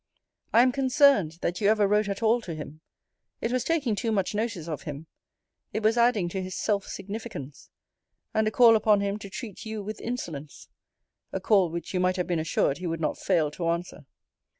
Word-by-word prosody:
I 235 Hz, -, +6 dB
am 255 Hz, -, +3 dB
concerned, 265 Hz, -, +4 dB
that 175 Hz, +3 st, -1 dB
you 200 Hz, -, +3 dB
ever 215 Hz, -2 st, +4 dB
wrote 210 Hz, +1 st, +2 dB
at 200 Hz, +3 st, -3 dB
all 230 Hz, +2 st, +3 dB
to 170 Hz, -7 st, -6 dB
him. 155 Hz, 0 st, -9 dB, 0.6 s
It 230 Hz, -, -2 dB
was 255 Hz, -1 st, 0 dB
taking 285 Hz, -10 st, 0 dB
too 225 Hz, +2 st, -1 dB
much 195 Hz, -3 st, 0 dB
notice 210 Hz, -6 st, -2 dB
of 155 Hz, -3 st, -4 dB
him: 150 Hz, +1 st, -7 dB, 0.7 s
it 215 Hz, -, -2 dB
was 220 Hz, +2 st, +4 dB
adding 235 Hz, -6 st, +3 dB
to 190 Hz, +2 st, -3 dB
his 185 Hz, 0 st, -5 dB
self 200 Hz, -2 st, -1 dB
significance; 195 Hz, -, -7 dB, 0.6 s
and 220 Hz, 0 st, +2 dB
a -, -, +4 dB
call 230 Hz, 0 st, +6 dB
upon 215 Hz, -2 st, +3 dB
him 200 Hz, +1 st, -2 dB
to 200 Hz, -, -9 dB
treat 210 Hz, 0 st, -7 dB
you 220 Hz, -2 st, -5 dB
with 215 Hz, +1 st, -6 dB
insolence. 160 Hz, -, -6 dB, 0.6 s
A -, -, -2 dB
call 195 Hz, -5 st, +3 dB
which 170 Hz, +3 st, -6 dB
you 185 Hz, -, +1 dB
might 180 Hz, 0 st, +2 dB
have 180 Hz, -, 0 dB
been 175 Hz, -2 st, -1 dB
assured 155 Hz, -2 st, 0 dB
he 180 Hz, -, -4 dB
would 165 Hz, -1 st, -2 dB
not 155 Hz, -, -2 dB
fail 165 Hz, -6 st, +1 dB
to 170 Hz, +2 st, -3 dB
answer. 170 Hz, +1 st, -3 dB
200 Hz, 205 wpm, -27 LUFS, 170-225 Hz, 0.7 s, I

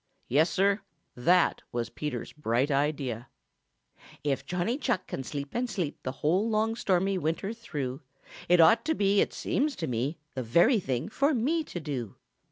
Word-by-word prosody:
Yes, 155 Hz, +7 st, +3 dB
Sir, 200 Hz, +2 st, +2 dB, 0.3 s
that 175 Hz, +9 st, +3 dB
was 120 Hz, -1 st, -3 dB
Peter 150 Hz, -5 st, -3 dB
Rabbit's -, -, -8 dB
bright 135 Hz, 0 st, 0 dB
idea. 135 Hz, -5 st, -1 dB, 1.0 s
"If 140 Hz, -2 st, -1 dB
Johnny 180 Hz, +8 st, -1 dB
Chuck 235 Hz, -11 st, 0 dB
can 135 Hz, -, -5 dB
sleep 140 Hz, +1 st, -5 dB
and 245 Hz, +1 st, -1 dB
sleep 175 Hz, -9 st, -3 dB
The 130 Hz, -, -3 dB
whole 190 Hz, +8 st, +3 dB
long, 220 Hz, +1 st, +1 dB
stormy 190 Hz, -3 st, +1 dB
winter 165 Hz, +6 st, -2 dB
through, 145 Hz, -, -5 dB, 0.5 s
It 180 Hz, 0 st, +6 dB
ought 165 Hz, +7 st, +6 dB
to 320 Hz, 0 st, +1 dB
be, 200 Hz, -2 st, +3 dB
it -, -, +1 dB
seems 290 Hz, 0 st, -1 dB
to 160 Hz, -, -3 dB
me, 130 Hz, +4 st, -2 dB, 0.2 s
The 130 Hz, -, -3 dB
very 170 Hz, -, +4 dB
thing 130 Hz, -6 st, -2 dB
for 280 Hz, +6 st, +2 dB
me 305 Hz, +8 st, +1 dB
to 175 Hz, -, -6 dB
do." 135 Hz, -, -4 dB
170 Hz, 175 wpm, -29 LUFS, 135-215 Hz, 1.0 s, It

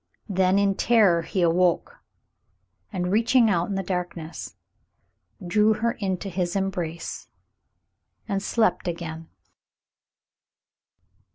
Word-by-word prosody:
Then 190 Hz, -1 st, +2 dB
in 200 Hz, -1 st, +3 dB
terror 200 Hz, -5 st, +4 dB
he 185 Hz, +3 st, -2 dB
aw^oke, 175 Hz, +1 st, +2 dB, 0.9 s
and, 180 Hz, -2 st, -2 dB
reaching 230 Hz, +1 st, +4 dB
out 175 Hz, -1 st, 0 dB
in 200 Hz, -, -2 dB
the 195 Hz, -, -1 dB
darkness, 175 Hz, -3 st, -5 dB, 0.9 s
drew 210 Hz, +5 st, +3 dB
her 235 Hz, +2 st, 0 dB
into 190 Hz, -3 st, -3 dB
his 180 Hz, -1 st, -2 dB
embrace 180 Hz, -4 st, -3 dB, 1.0 s
and 195 Hz, -2 st, -1 dB
slept 220 Hz, -2 st, +1 dB
again. 165 Hz, -1 st, -5 dB
190 Hz, 100 wpm, -25 LUFS, 175-205 Hz, 1.0 s, terror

